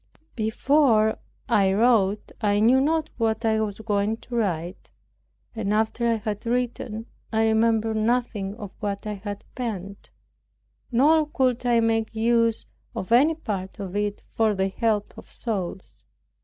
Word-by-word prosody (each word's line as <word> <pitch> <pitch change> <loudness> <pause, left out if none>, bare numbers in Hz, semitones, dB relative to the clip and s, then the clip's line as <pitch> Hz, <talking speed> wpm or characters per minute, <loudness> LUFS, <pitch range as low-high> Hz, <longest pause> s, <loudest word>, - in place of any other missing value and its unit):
Before 220 0 +2 0.3
I 195 -2 +3
wrote 210 -2 +2
I 205 -1 +2
knew 245 +5 +5
not 315 +2 0
what 225 0 0
I 220 -1 +2
was 205 -2 -3
going 210 0 0
to 245 - -7
write. 180 -5 -2 0.7
And 210 -3 -2
after 220 +2 +1
I 230 - +3
had 210 -1 -4
written, 235 -2 -2 0.3
I 220 0 +2
remembered 220 0 +2
nothing 215 -3 0
of 205 -4 -8
what 200 -1 -3
I 210 - -2
had 205 0 -7
penned; 200 -6 -5 0.8
nor 300 +6 +4
could 255 -4 0
I 235 -1 +4
make 225 -1 0
use 230 0 +2 0.3
of 190 - -5
any 285 +7 +5
part 200 - -5
of 195 -1 -6
it 205 0 -2
for 220 -2 +2
the 190 0 0
help 210 0 -1
of - - -15
souls. 195 -5 -5
220 Hz, 145 wpm, -25 LUFS, 205-235 Hz, 0.8 s, knew